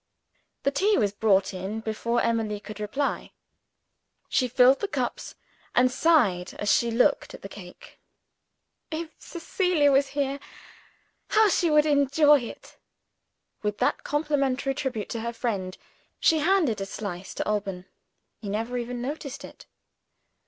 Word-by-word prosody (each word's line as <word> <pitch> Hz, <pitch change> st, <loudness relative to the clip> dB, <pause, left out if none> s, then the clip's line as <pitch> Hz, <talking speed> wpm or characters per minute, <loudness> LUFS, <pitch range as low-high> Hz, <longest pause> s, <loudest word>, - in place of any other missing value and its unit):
The 275 Hz, -, +2 dB
tea 400 Hz, +9 st, +2 dB
was 205 Hz, -4 st, +2 dB
brought 200 Hz, -2 st, +2 dB
in 190 Hz, +4 st, -4 dB
before 225 Hz, +2 st, -1 dB
Emily 220 Hz, -3 st, 0 dB
could 210 Hz, 0 st, -10 dB
reply. 240 Hz, +8 st, -2 dB, 1.0 s
She 255 Hz, -, +2 dB
filled 250 Hz, +2 st, +5 dB
the 410 Hz, -, -2 dB
cups, -, -, -4 dB, 0.4 s
and 250 Hz, +1 st, +4 dB
sighed 235 Hz, -, +2 dB
as 205 Hz, -, 0 dB
she 235 Hz, -, +2 dB
looked 230 Hz, +2 st, +1 dB
at -, -, -15 dB
the -, -, -5 dB
cake. -, -, -13 dB, 0.9 s
"If 320 Hz, 0 st, -5 dB
Cecilia 345 Hz, -4 st, +1 dB
was 275 Hz, +1 st, +3 dB
here, 280 Hz, 0 st, 0 dB, 0.9 s
how 435 Hz, -1 st, +4 dB
she 350 Hz, -2 st, +2 dB
would 300 Hz, 0 st, +4 dB
enjoy 290 Hz, 0 st, +4 dB
it!" 235 Hz, -, -10 dB, 0.8 s
With 210 Hz, -1 st, -2 dB
that -, -, 0 dB
complimentary 280 Hz, -3 st, 0 dB
tribute 255 Hz, -7 st, -3 dB
to 230 Hz, -, -4 dB
her 235 Hz, +1 st, -3 dB
friend, 200 Hz, -6 st, -3 dB, 0.4 s
she 320 Hz, -, +4 dB
handed 315 Hz, -, +2 dB
a 195 Hz, -, -3 dB
slice 195 Hz, -2 st, -6 dB
to -, -, -3 dB
Alban. 200 Hz, -3 st, -2 dB, 0.5 s
He 205 Hz, -, -7 dB
never 230 Hz, +4 st, -2 dB
even 240 Hz, 0 st, -5 dB
noticed 280 Hz, 0 st, -5 dB
it. -, -, -14 dB
250 Hz, 140 wpm, -26 LUFS, 210-295 Hz, 1.0 s, filled